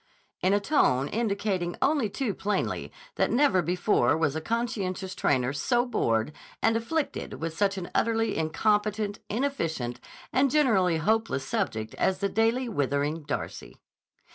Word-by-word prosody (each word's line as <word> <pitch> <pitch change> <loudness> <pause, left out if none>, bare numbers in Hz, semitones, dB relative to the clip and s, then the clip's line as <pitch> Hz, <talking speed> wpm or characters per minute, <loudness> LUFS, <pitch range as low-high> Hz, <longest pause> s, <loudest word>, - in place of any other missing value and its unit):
in 185 - +3
a 205 - +4
tone 145 - +2
indicating 200 -5 -1
only 275 -6 +2
too 225 0 -2
plainly 205 +2 -2 0.3
that - - +2
never 240 -8 +3
before 175 - +2
was 160 -3 +1
conscientious 200 -4 -2
trainer 130 -5 +1
so 240 - +1
bored 115 - 0 0.3
and 225 0 +2
afflicted 285 +7 -2
with 160 0 -4
such 200 +1 +1
an 180 -2 -4
utterly 225 -1 +1
incompetent, 210 +5 0
inefficient, 165 - -2 0.3
and 270 +1 +4
generally 215 - +3
hopeless 215 -5 0
subject 110 -4 -2
as 190 - +2
the 200 +1 -1
daily 225 +5 +1
withering 145 - -1
Darcy. 145 -1 -5
200 Hz, 135 wpm, -27 LUFS, 160-225 Hz, 0.3 s, a